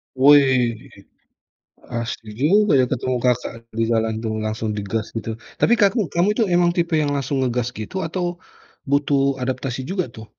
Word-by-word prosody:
Wih, 130 -4 +5 1.1
asik 115 -1 -4 0.2
juga 200 +7 +4
ya 130 - +4
ketemu 130 -1 -1
Kakak 125 -1 +1 0.3
di - - +3
jalan 110 -1 +1
tuh, 110 - -2
langsung 110 0 -2
digas 105 +2 -2
gitu. 115 0 -4 0.2
Tapi 235 - +5
kaku 200 -1 +2
kamu 175 +3 +2
itu 225 - +1
emang 175 0 +3
tipe 170 -1 0
yang 145 - 0
langsung 140 0 -2
ngegas 125 -1 -1
gitu, 110 - -7
atau 175 0 -3 0.5
butuh 140 -1 +2
adaptasi 130 0 -3
juga 185 +1 -2
tuh? 110 -1 -11
135 Hz, 155 wpm, -21 LUFS, 115-170 Hz, 1.1 s, Wih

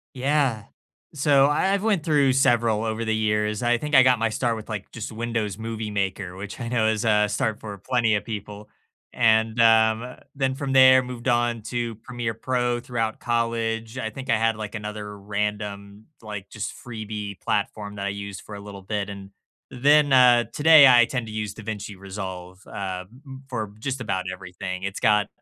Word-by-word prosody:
Yeah. 135 -4 0 0.5
So, 140 -2 +4
I 155 +7 +1
I've 200 0 0
went 205 -8 +1
through 145 -4 +3
several 115 -4 +2
over 110 +1 -2
the 110 0 0
years, 105 -1 0
I 120 0 +3
think 150 +4 -2
I 130 - +8
got 125 -1 +4
my 115 0 0
start 115 +1 -1
with, 110 -1 -9
like, 105 -2 -5
just 115 - -6
Windows 110 -3 -3
Movie 110 -1 -5
Maker, 95 -2 -3
which 100 +5 -8
I 115 - -4
know 115 -3 +1
is 110 0 0
a 105 -1 +3
start 105 +1 -1
for 105 -2 -8
plenty 115 +1 +1
of 105 - -1
people, 105 -1 -7 0.4
and, 110 0 +2
um, 115 +1 +4 0.2
then 135 -1 0
from 140 -1 -4
there 130 -1 +7
moved 125 -1 -7
on 120 -2 +1
to 120 0 -3
Premiere 120 +1 -5
Pro 120 +1 -1
throughout 120 -3 -3
college. 115 -1 -1
I 110 - -3
think 130 +4 -9
I 115 - +4
had, 115 0 +1
like, 105 -1 -6
another 105 -1 -6
random, 105 0 -4 0.2
like, 105 -3 -7
just 110 - -5
freebie 105 -4 -7
platform 105 0 -2
that 100 0 -4
I - - 0
used 100 -1 -6
for 105 - -9
a 100 - -8
little 100 -1 -10
bit, 105 +1 -3
and 100 -1 -9 0.4
then, 145 +2 +4
uh, 125 -2 +6
today 150 -1 +8
I 120 -2 +7
tend 125 -2 -4
to 110 - -8
use 105 -2 -3
DaVinci 105 -2 -6
Resolve, 95 -1 -8
uh, 95 -2 -4
m 125 +3 -17
m 135 0 -10
for 110 -5 -4
just 135 +3 -3
about 95 -6 -2
everything, 90 0 -6
it's 95 0 -4
got 105 -2 +3
110 Hz, 190 wpm, -24 LUFS, 105-120 Hz, 0.5 s, I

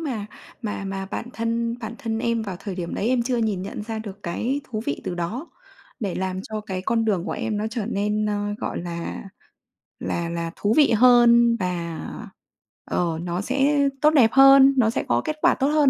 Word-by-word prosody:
mà 245 -10 -3 0.4
mà 205 -2 -4
mà 195 0 -4
bản 240 - -4
thân 230 0 -1
bản 225 0 -6
thân 225 -1 -3
em 235 -1 0
vào 195 -4 -5
thời 195 0 -6
điểm 175 -2 -4
đấy 215 - -1
em 250 -1 +2
chưa 250 +1 -1
nhìn 215 -5 0
nhận 200 - -6
ra 220 +1 -5
được 205 -2 -8
cái 235 +11 -2
thú 215 -4 -4
vị 140 - -2
từ - - -3
đó, 205 - -4 0.5
để 200 -5 -2
làm 185 0 -2
cho 215 +1 -5
cái 190 -3 -5
con 225 +3 +1
đường 195 -6 0
của - - -3
em 215 -2 -2
nó 210 - -1
trở 225 -3 -3
nên, 210 -1 0
ơ, 205 0 -1
gọi - - -3
là, 170 -1 -5 0.8
là 170 -1 -2
là 170 0 -3
thú 205 +2 +1
vị 295 -4 +6
hơn 235 0 +6
và, 170 -3 -3 0.9
ờ, 165 -2 0
nó 175 +1 -2
sẽ 280 +4 +2
tốt 305 - +6
đẹp 265 -8 +5
hơn, 270 0 +8
nó 230 -3 +4
sẽ 225 - -1
có - - +2
kết 310 -1 -2
quả - - +5
tốt 270 - +1
hơn 295 -1 +4
220 Hz, 210 wpm, -23 LUFS, 190-240 Hz, 0.9 s, hơn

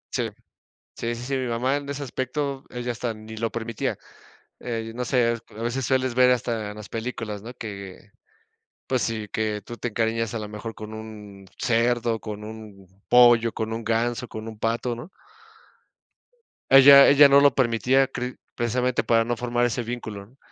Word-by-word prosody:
Sí, - - 0 0.7
sí, 120 0 -3
sí, 120 - -7
sí, 135 +2 -2
mi 130 -1 -1
mamá 125 +4 0
en 140 -1 -7
ese 140 0 -4
aspecto, 135 +1 -3
ella 125 0 -4
hasta 120 0 -3
ni 110 +1 -10
lo 115 +1 -2
permitía. 115 -1 -3 0.6
Eh, 115 -2 -4
no 125 0 -3
sé, 120 -2 +2
a 110 - -9
veces 120 +2 -2
sueles 130 -1 0
ver 125 0 +6
hasta 115 -4 -1
en 105 - -11
las 105 - -10
películas, 110 -3 -5
¿no?, 120 +2 -8
que, 100 -5 -9 0.8
pues 130 -2 0
sí, 110 -2 -3
que 105 -1 -2
tú 120 +3 -9
te 120 - -3
encariñas 115 0 -1
a 115 - -2
lo 105 -1 -6
mejor 105 +2 -7
con 110 0 -8
un 105 -3 -10
cerdo, 120 -1 +1
con 105 -1 -7
un 105 -3 -10 0.2
pollo, 120 -2 +6
con 110 0 -3
un 115 +1 -4
ganso, 115 +2 -1
con 110 0 -8
un 110 -1 -8
pato, 115 +2 -1
¿no? 120 +9 -9 1.6
Ella 140 +1 +9
ella 145 +1 +8
no 140 0 +7
lo 140 -1 +5
permitía, 130 +2 +2
cre 125 -1 -5 0.2
precisamente, 125 +1 0
para 115 -1 +3
no 120 +1 -1
formar 120 +1 0
ese 120 0 -1
vínculo, 110 -4 -6
¿no?, 130 +5 -25
115 Hz, 180 wpm, -24 LUFS, 110-125 Hz, 1.6 s, Ella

